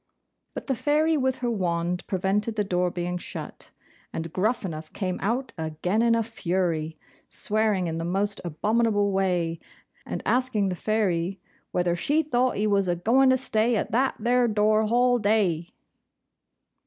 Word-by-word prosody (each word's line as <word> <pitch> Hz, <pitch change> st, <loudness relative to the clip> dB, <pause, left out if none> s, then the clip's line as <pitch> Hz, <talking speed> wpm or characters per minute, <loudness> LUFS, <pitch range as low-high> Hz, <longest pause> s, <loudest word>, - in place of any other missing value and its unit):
But -, -, -5 dB
the 270 Hz, -, 0 dB
Fairy, 300 Hz, +5 st, +2 dB
with 260 Hz, -3 st, 0 dB
her 240 Hz, -, +1 dB
wand, 175 Hz, -3 st, -1 dB
prevented 200 Hz, +4 st, 0 dB
the 210 Hz, -, +1 dB
door 180 Hz, -2 st, 0 dB
being 175 Hz, 0 st, -3 dB
shut; -, -, -8 dB, 0.4 s
and 165 Hz, 0 st, -5 dB
Gruffanuff 185 Hz, -7 st, -2 dB
came 185 Hz, -2 st, -3 dB
out 245 Hz, +6 st, -1 dB
again 160 Hz, +7 st, -1 dB
in 230 Hz, 0 st, +4 dB
a 230 Hz, -, +1 dB
fury, 170 Hz, -7 st, -2 dB, 0.3 s
swearing 210 Hz, -3 st, 0 dB
in 165 Hz, -1 st, -3 dB
the -, -, -3 dB
most 195 Hz, +4 st, -1 dB
abominable 205 Hz, +4 st, +1 dB
way, 180 Hz, -4 st, 0 dB, 0.4 s
and -, -, -5 dB
asking 245 Hz, -6 st, +1 dB
the 180 Hz, -, -2 dB
Fairy 190 Hz, -3 st, 0 dB, 0.3 s
'whether 175 Hz, -1 st, +1 dB
she 295 Hz, -, +1 dB
thought 255 Hz, -3 st, +1 dB
he 210 Hz, -, +1 dB
was 200 Hz, -2 st, +2 dB
a 175 Hz, -, +1 dB
going 250 Hz, +9 st, +3 dB
to 260 Hz, -, +4 dB
stay 235 Hz, -2 st, +1 dB
at 210 Hz, -, -2 dB
that 260 Hz, +4 st, +1 dB
there 245 Hz, +2 st, +2 dB
door 215 Hz, 0 st, +2 dB
hall 245 Hz, +2 st, +3 dB
day? 195 Hz, -6 st, +1 dB
205 Hz, 155 wpm, -26 LUFS, 180-235 Hz, 0.4 s, in